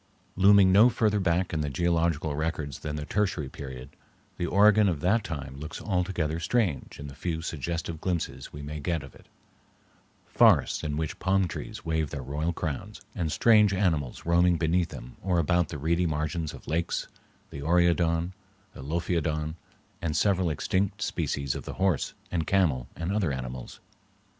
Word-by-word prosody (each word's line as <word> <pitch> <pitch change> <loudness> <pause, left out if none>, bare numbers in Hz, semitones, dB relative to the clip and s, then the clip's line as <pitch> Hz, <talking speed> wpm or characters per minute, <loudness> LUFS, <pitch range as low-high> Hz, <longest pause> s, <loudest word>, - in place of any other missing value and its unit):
Looming 100 0 +6
no 105 +6 +7
further 105 -3 +1
back 90 -1 +1
in 80 - 0
the 75 - -1
geological 80 0 0
records 75 -3 -3
than 75 -1 -4
the 75 -1 -4
Tertiary 90 -6 -1
Period, 65 0 -8 0.5
the 85 - -1
Oregon 105 +2 +5
of 80 -5 -1
that 100 +6 +2
time 70 -8 -6
looks 75 +3 -7
altogether 90 -5 -1
strange 90 - -1
in 70 - -7
the 70 - -8
few 80 +2 -3
suggestive 80 +1 -4
glimpses 90 -3 -3
we 75 - -8
may 75 +1 -5
get 80 0 -2
of 65 - -12
it—forests - - -1
in 75 -1 -2
which 80 -1 -3
palm 95 0 +2
trees 75 - -7
wave 80 -2 0
their 70 -3 -5
royal 75 +6 -2
crowns, 90 +5 -5
and 85 -5 -2
strange 105 -1 +5
animals 80 -10 -1
roaming 85 +1 +4
beneath 85 +2 +1
them - - -10
or 90 -1 +1
about 85 0 +2
the 80 - -5
reedy 85 +4 +1
margins 80 +1 -2
of - - -12
lakes, 85 +2 -1 0.4
the 70 - -7
oreodon, 85 +1 +2 0.4
the - - -10
lophiodon, 80 0 -1 0.5
and 80 -3 -1
several 95 -4 +2
extinct 95 +6 -1
species 70 -2 -1
of - - -6
the - - -5
horse, 95 -6 0 0.2
the 85 -3 0
camel, 80 -9 +1
and 85 +3 -3
other 100 -7 +1
animals. 65 -1 -6
85 Hz, 165 wpm, -28 LUFS, 75-90 Hz, 0.5 s, no